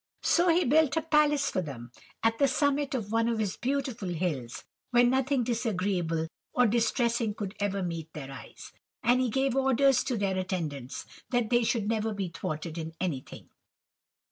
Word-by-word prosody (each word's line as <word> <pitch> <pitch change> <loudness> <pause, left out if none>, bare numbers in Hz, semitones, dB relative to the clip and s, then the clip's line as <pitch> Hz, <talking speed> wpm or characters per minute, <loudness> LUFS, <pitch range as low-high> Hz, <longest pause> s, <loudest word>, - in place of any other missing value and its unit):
So 350 +1 +4
he 340 +2 +4
built 310 +3 +3
a 320 - +1
palace 300 -2 +3
for 185 - 0
them, 125 -7 -8 0.3
at 225 0 +2
the 280 - +5
summit 285 +1 +1
of 215 -5 -3
one 230 0 +2
of 230 - 0
his 210 -4 -1
beautiful 255 -6 -2
hills, 155 -9 -3 0.3
where 245 -1 +5
nothing 260 +1 +2
disagreeable 185 -8 -1 0.3
or 250 - +4
distressing 235 -1 +1
could 200 -3 -5
ever 200 -1 -1
meet 165 -2 -4
their 135 -3 -7
eyes, 130 -4 -11 0.3
and 245 +3 +4
he 255 - +1
gave 265 +2 +1
orders 270 0 +3
to 250 -3 -1
their 195 -2 0
attendants, 155 -9 -4 0.2
that 245 -3 0
they 240 0 +4
should 225 -2 0
never 220 -1 0
be 195 -3 -2
thwarted 160 0 -5
in 160 0 -5
anything. 165 -8 -4
225 Hz, 170 wpm, -29 LUFS, 180-260 Hz, 0.3 s, the